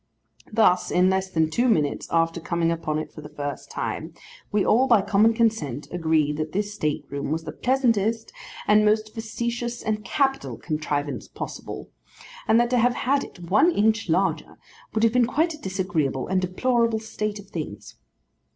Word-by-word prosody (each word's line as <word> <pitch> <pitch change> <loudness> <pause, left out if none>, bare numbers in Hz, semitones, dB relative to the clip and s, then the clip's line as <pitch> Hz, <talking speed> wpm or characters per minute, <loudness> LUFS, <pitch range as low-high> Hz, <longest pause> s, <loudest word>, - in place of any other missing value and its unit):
Thus, 210 -5 +3
in 180 +1 +3
less 190 0 0
than 160 -3 +1
two 240 +9 +2
minutes 150 -10 +1
after 165 0 +1
coming 170 0 0
upon 160 -2 -2
it 155 - -4
for 155 - -9
the 150 - -10
first 145 -2 -6
time, - - -4 0.4
we 205 -1 +2
all 255 +5 +4
by 230 -6 +5
common 210 +2 +4
consent 215 - 0
agreed 160 -4 +1
that 155 0 -3
this 205 +2 -1
state 155 -8 -2
room 140 -1 -3
was 160 +1 -1
the 155 - -6
pleasantest 230 - +1 0.3
and 210 0 +5
most 215 0 +2
facetious 235 +1 -4
and 215 -1 -1
capital 270 -2 0
contrivance 150 -2 -3
possible; - - -7 0.6
and 225 - +5
that 240 0 +2
to 250 - +3
have 245 +1 +3
had 275 +2 +1
it 175 -1 -11
one 215 - +6
inch 220 - +1
larger, 185 +4 0 0.4
would 220 - +1
have 230 0 +4
been 245 -2 +4
quite 320 +6 +1
a 305 - -11
disagreeable 175 -9 -1
and 185 0 +1
deplorable 230 +5 +1
state 215 -1 -4
of 200 -1 -12
things. 150 - -7
205 Hz, 175 wpm, -24 LUFS, 160-230 Hz, 0.6 s, one